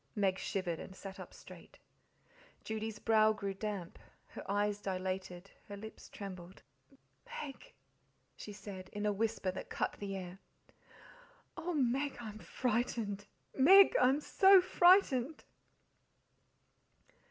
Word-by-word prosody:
Meg 195 -3 +1
shivered, 175 -4 -3
and 190 - -9
sat 195 +1 -9
up 185 - -9
straight. - - -14 0.9
Judy's 220 0 -4
brow, 220 0 +4
grew 200 -2 -4
damp, 195 -3 -5 0.3
her - - -9
eyes 205 0 0
dilated, 185 -1 -4 0.2
her 205 - -7
lips 220 +2 -10
trembled. 185 -2 -9 0.8
"Meg!" 295 - -10 0.6
she 210 - -9
said, 195 -2 -9
in 205 0 -3
a 210 - +2
whisper 215 -2 -1
that 185 - -8
cut - - -1
the 200 -1 -4
air. 185 0 -7 1.2
"Oh, 340 0 -3
Meg, 275 +1 0
I'm 215 -3 -8
frightened! 220 -4 -2 0.3
MEG, 380 +9 +7
I'm 260 +3 +4
so 385 +4 +6
frightened!" 350 -7 +4
210 Hz, 120 wpm, -34 LUFS, 195-250 Hz, 1.2 s, MEG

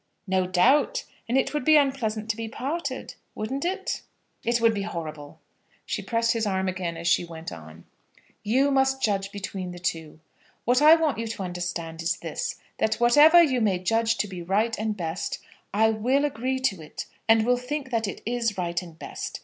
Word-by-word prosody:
"No 185 -2 +1
doubt; 265 - +3 0.3
and 250 - +2
it 270 - +1
would 295 - -1
be 310 +3 +6
unpleasant 235 -7 0
to - - -6
be 225 0 -5
parted; 275 +3 -4 0.2
wouldn't 260 +6 -3
it?" 380 +3 -2 0.4
"It 235 0 +1
would 230 -1 +4
be 205 - -2
horrible." 155 -7 -6 0.5
She - - -3
pressed 230 -1 +1
his 225 -2 0
arm 190 -1 0
again 180 -2 -3
as 170 +1 -4
she 175 - +4
went 165 -1 -8
on. 80 0 -11 0.6
"You 260 +7 +2
must 265 0 +2
judge 195 -2 0
between 195 -2 -5
the - - -9
two. 165 -3 -4 0.5
What 250 +3 +3
I 310 +2 +9
want 315 -7 0
you 230 - -2
to 220 -3 -4
understand 175 -2 -4
is 170 +2 0
this, - - -4 0.2
that 220 0 +2
whatever 295 +9 +7
you 260 -6 +1
may 200 -4 +2
judge 225 +5 +1
to 210 - 0
be 185 -3 -7
right 210 +6 +1
and 215 -1 -2
best, 165 0 -3 0.3
I 220 +2 +3
will 255 +7 +1
agree 260 -1 -1
to 195 -10 0
it, 150 - -7 0.2
and 225 -1 +5
will 250 +1 +3
think 265 +2 -4
that 225 -2 0
it 200 - -6
is 230 -3 -1
right 175 -1 -1
and 170 -3 -12
best. - - -6
220 Hz, 195 wpm, -26 LUFS, 180-260 Hz, 0.6 s, I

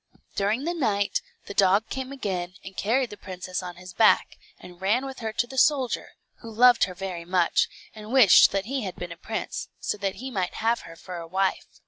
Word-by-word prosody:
During 210 +6 0
the 340 +3 -1
night, 210 -11 0 0.2
the - - -7
dog 200 +3 +3
came 265 0 -4
again 185 -9 -4
and 190 0 -9
carried 240 +4 0
the 210 - -9
princess 185 -1 -5
on 180 -1 -7
his 180 +1 -11
back, 220 +4 +4 0.2
and 180 0 -13
ran 220 +8 +1
with 270 -1 -7
her 220 -2 -3
to 230 +2 +1
the 265 +2 -3
soldier, 265 -4 +2 0.3
who 230 - -10
loved 240 +2 +5
her 185 -2 -9
very 185 -2 -5
much, 180 0 +2 0.2
and 215 0 -10
wished 250 -8 +8
that 195 -1 -1
he 270 +3 -2
had 190 -4 -5
been 175 -1 -7
a - - -6
prince, 220 +6 -5
so 210 - -3
that 195 -1 -2
he 260 +2 -7
might 185 -5 -2
have 230 +1 +1
her 165 - -11
for 180 +1 -8
a 165 -1 -7
wife. 190 +2 0
200 Hz, 215 wpm, -26 LUFS, 185-240 Hz, 0.3 s, wished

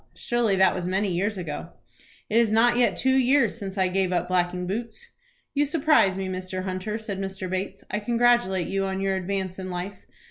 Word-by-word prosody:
"Surely 235 -4 0
that 190 -1 +4
was 180 -1 -3
many 195 +2 0
years 200 +4 -1
ago?" 160 -5 -5 0.6
"It 220 - +1
is 230 -2 +4
not 235 +2 +4
yet 245 0 +3
two 260 0 +2
years 260 -3 +3
since 195 -3 -6
I 190 -1 +3
gave 185 0 0
up 175 0 0
blacking 180 0 0
boots." 230 - -5 0.5
"You 290 - +2
surprise 290 - +3
me 190 -1 -3
Mr. 185 0 -4
Hunter," 185 +3 -3
said 210 -3 -5
Mr. 190 -1 -4
Bates 190 +1 -4
"I 210 - 0
congratulate 235 -5 +2
you 195 +3 -1
on 190 0 -2
your 195 0 0
advance 190 0 -3
in 185 0 -5
life. 180 +2 -6
195 Hz, 200 wpm, -25 LUFS, 185-230 Hz, 0.6 s, that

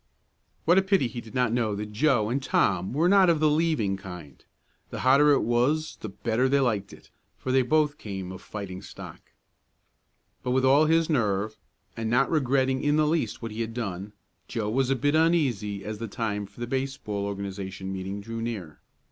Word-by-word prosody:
What 175 +4 +6
a - - +3
pity 190 -8 +2
he 120 +1 -6
did 115 +2 -13
not 125 -3 +2
know 115 -4 0
that 105 +1 -5
Joe 115 -2 +2
and 135 +3 0
Tom 95 -7 +1
were 155 +7 +2
not 195 -1 +6
of 165 -2 +3
the 155 - +4
"leaving" 150 -11 +1
kind. 90 -7 -10 0.5
The - - -5
hotter 140 +3 +5
it 140 - +4
was 130 +7 +1
the 110 - -7
better 115 +6 0
they 140 +1 +3
liked 110 -7 0
it, - - -16 0.3
for 130 - -3
they 130 0 +4
both 150 +2 +1
came 95 -3 -6
of 95 0 -9
fighting 100 -4 -7
stock. - - -10 1.2
But - - -4
with 130 0 +2
all 140 +4 +5
his 165 +1 +3
nerve, 110 - 0 0.4
and 115 -1 -3
not 125 +3 +2
regretting 135 -3 +1
in 145 0 +3
the 155 0 +3
least 150 -9 -1
what 115 - -4
he 110 +2 -4
had 115 0 -4
done, 100 -3 -4 0.3
Joe 105 -2 -2
was 130 +2 +1
a 135 - +3
bit 145 +3 +1
uneasy 130 - +1
as 105 0 -5
the 115 - -4
time 105 -2 -3
for 100 +4 -15
the - - -1
baseball 130 -5 -3
organization 95 -1 -5
meeting 95 +2 -5
drew 115 +2 -6
near. 100 -10 -5
120 Hz, 200 wpm, -26 LUFS, 100-140 Hz, 1.2 s, What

